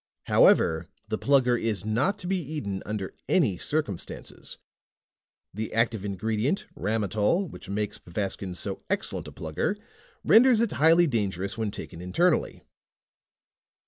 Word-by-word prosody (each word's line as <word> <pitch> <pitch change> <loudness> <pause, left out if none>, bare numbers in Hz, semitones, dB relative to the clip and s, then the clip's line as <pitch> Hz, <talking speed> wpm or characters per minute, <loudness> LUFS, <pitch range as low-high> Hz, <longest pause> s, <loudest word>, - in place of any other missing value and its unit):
HOWEVER 80 +1 +4 0.2
THE 110 - -2
PLUGGER 130 -3 +3
IS 110 -4 -2
NOT 125 - +1
TO 190 - -11
BE 185 0 0
EATEN 100 -11 -3
UNDER 105 -3 -4 0.2
ANY 125 - +2
CIRCUMSTANCES. 145 - -4 1.0
THE 110 +3 -4
ACTIVE 115 -3 +1
INGREDIENT, 110 - -1
RAMOTOL, 110 - 0
WHICH - - -11
MAKES 105 +1 -3
PVASTKIN'S 95 0 -4
SO - - -4
EXCELLENT - - -2
A - - -8
PLUGGER 80 - -2 0.5
RENDERS 240 +1 +6
IT 230 -2 +1
HIGHLY 165 +3 +5
DANGEROUS 100 - -1
WHEN 110 -2 -2
TAKEN 85 -4 -8
INTERNALLY." 165 - +1
110 Hz, 125 wpm, -27 LUFS, 100-155 Hz, 1.0 s, RENDERS